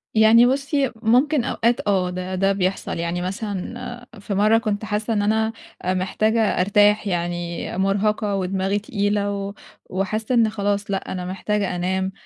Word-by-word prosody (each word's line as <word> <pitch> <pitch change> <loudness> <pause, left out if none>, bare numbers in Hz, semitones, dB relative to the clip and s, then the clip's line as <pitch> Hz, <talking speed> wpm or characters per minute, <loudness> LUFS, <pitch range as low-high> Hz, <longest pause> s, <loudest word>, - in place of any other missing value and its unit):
يعني 220 +2 +7
بُصّي، 275 +1 +1
ممكن 250 +5 +2
أوقات 235 -2 0
آه 185 -3 +2
ده 185 +1 -4
ده 195 +1 +2
بيحصل، 195 -1 -1
يعني 170 +1 -2
مثلًا 215 +5 -5
في 200 +1 -5
مرّة 215 +3 +4
كنت 215 -2 -2
حاسة 215 +1 -1
إن 205 - +1
أنا 220 +2 +1 0.3
محتاجة 190 +5 +1 0.2
أرتاح 205 +2 +3
يعني 175 -1 -3
مُرهقة 200 +2 +1
ودماغي 195 +1 -1
تقيلة 205 -1 -1
و 200 0 -4 0.4
وحاسة 215 +6 -1
إن 230 -2 +4
خلاص 205 -1 -2
لأ 195 - -3
أنا 180 -1 -4
محتاجة 195 +1 -2
أنام، 190 +2 -1
205 Hz, 145 wpm, -22 LUFS, 190-220 Hz, 0.4 s, يعني